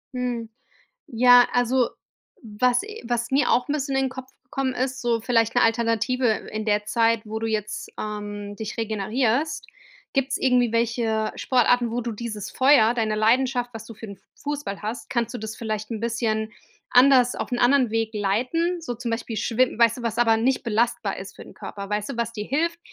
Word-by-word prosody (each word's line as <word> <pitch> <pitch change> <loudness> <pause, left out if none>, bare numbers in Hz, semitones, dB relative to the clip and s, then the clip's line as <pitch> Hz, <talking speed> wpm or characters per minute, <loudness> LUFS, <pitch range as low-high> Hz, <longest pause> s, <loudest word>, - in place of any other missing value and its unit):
Mhm. 245 -3 -3 0.6
Ja, 245 +1 +6
also, 245 0 +2 0.5
was 245 +3 +1
e 430 - -9
was 240 +1 -2
mir 280 +2 +3
auch 245 0 +2
'n - - +1
bisschen 275 -2 -2
in 270 - +2
den - - -1
Kopf 260 0 -9
gekommen 260 0 -2
ist, 260 +1 -2
so 235 -1 +1
vielleicht 230 -1 +1
'ne 245 - +4
Alternative 230 +2 +1 0.2
in 215 0 -3
der 210 -1 +1
Zeit, 230 0 +2
wo 220 +1 -4
du 225 - -2
jetzt, 215 -1 -3
ähm, 205 -1 -5
dich 220 -1 -6
regenerierst, 230 +7 -1 0.5
gibt's 270 0 0
irgendwie 250 -3 +2
welche 230 -1 0
Sportarten, 245 -2 +2
wo 240 - -1
du 235 0 -3
dieses 215 -2 -5
Feuer, 260 -4 +5
deine 220 -3 0
Leidenschaft, 245 +3 +2
was 225 0 -8
du 230 - -10
für 225 - -9
'n 200 - -9 0.2
Fußball 290 -9 -5
hast? 220 +4 -5
Kannst 235 -2 -1
du - - -4
das 220 0 -6
vielleicht 215 0 -4
'n 220 - -3
bisschen 225 -2 -1 0.4
anders 250 -1 +5
auf - - -5
'n 245 - -1
anderen 250 -2 +4
Weg 225 -1 0
leiten? 250 - 0
So 245 -7 -4
zum 235 0 -4
Beispiel 230 0 -3
Schwimm 245 +1 +1
weißt 230 +1 +4
du - - -8
was 230 -1 -2
aber 225 -2 +4
nicht 255 +3 +1
belastbar 230 -2 0
ist 190 +1 -9
für - - -10
den - - -14
Körper? 200 -1 -8
Weißt 210 +3 -2
du, - - -7
was 235 -1 -1
dir 210 -1 -5
hilft, 335 +5 -1
235 Hz, 195 wpm, -24 LUFS, 220-250 Hz, 0.6 s, Ja